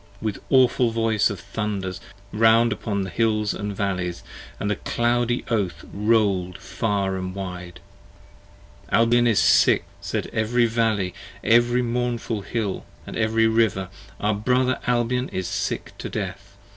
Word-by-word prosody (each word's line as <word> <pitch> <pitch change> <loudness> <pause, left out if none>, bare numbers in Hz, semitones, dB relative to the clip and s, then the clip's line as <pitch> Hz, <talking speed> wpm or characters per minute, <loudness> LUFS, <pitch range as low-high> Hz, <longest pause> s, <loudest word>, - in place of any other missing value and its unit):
with 110 -3 -3
awful 130 -2 +4
voice 115 -2 +1
of 100 - -5
thunders 100 0 -4 0.3
round 115 +2 +5
10 - - -2
Upon 100 -3 -2
the 95 - -6
hills 105 +1 +1
& - - -3
valleys, 95 -4 -3 0.4
and 100 - -1
the - - +1
cloudy 120 +1 0
Oath 95 -8 -1
roll'd 100 -4 +1
far 100 -3 -1
and 95 0 -5
wide. 90 -2 -7 1.1
Albion 120 +1 +4
is 110 -4 +2
sick! - - +4 0.2
said - - -2
every 120 +2 +2
Valley, 110 -5 0 0.3
every 120 +2 +4
mournful 120 -2 -2
Hill 105 -2 -3 0.2
And - - -8
every 110 +1 +2
River: 110 -4 +2 0.3
our 105 +1 +1
brother 125 +4 +1
Albion 125 +1 +1
is 95 -1 -3
sick 95 - -3
to - - -5
death. - - -6
110 Hz, 140 wpm, -23 LUFS, 100-115 Hz, 1.1 s, round